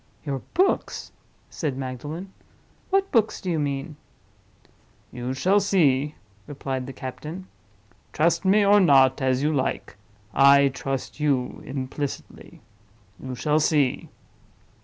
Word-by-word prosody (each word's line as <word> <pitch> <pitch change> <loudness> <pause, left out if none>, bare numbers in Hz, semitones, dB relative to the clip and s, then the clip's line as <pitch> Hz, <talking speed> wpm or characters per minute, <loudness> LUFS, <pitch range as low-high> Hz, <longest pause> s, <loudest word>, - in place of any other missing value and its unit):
"Your 140 -2 -2 0.2
books?" 380 +2 0 0.4
said 145 -6 -3
Magdalen. 145 +8 -6 0.6
"What 390 0 +1
books 220 -3 +2
do 185 - -3
you 160 - 0
mean?" 145 +1 -3 1.1
"You 125 +1 -4
shall 190 +9 +3
see," 150 -8 +2 0.3
replied 135 -3 -4
the - - -6
captain. 150 +7 -7 0.7
"Trust 170 +5 +1
me, 200 +2 +4
or 205 +1 +6
not, 135 -7 +5
as 130 0 +1
you 155 +1 +1
like—I 130 +3 +2
trust 135 +2 -5
you 135 -4 0
implicitly. 135 +1 -6 0.6
You 130 -1 -6
shall 150 +6 +1
see." 150 -4 +1
140 Hz, 115 wpm, -24 LUFS, 130-165 Hz, 1.1 s, or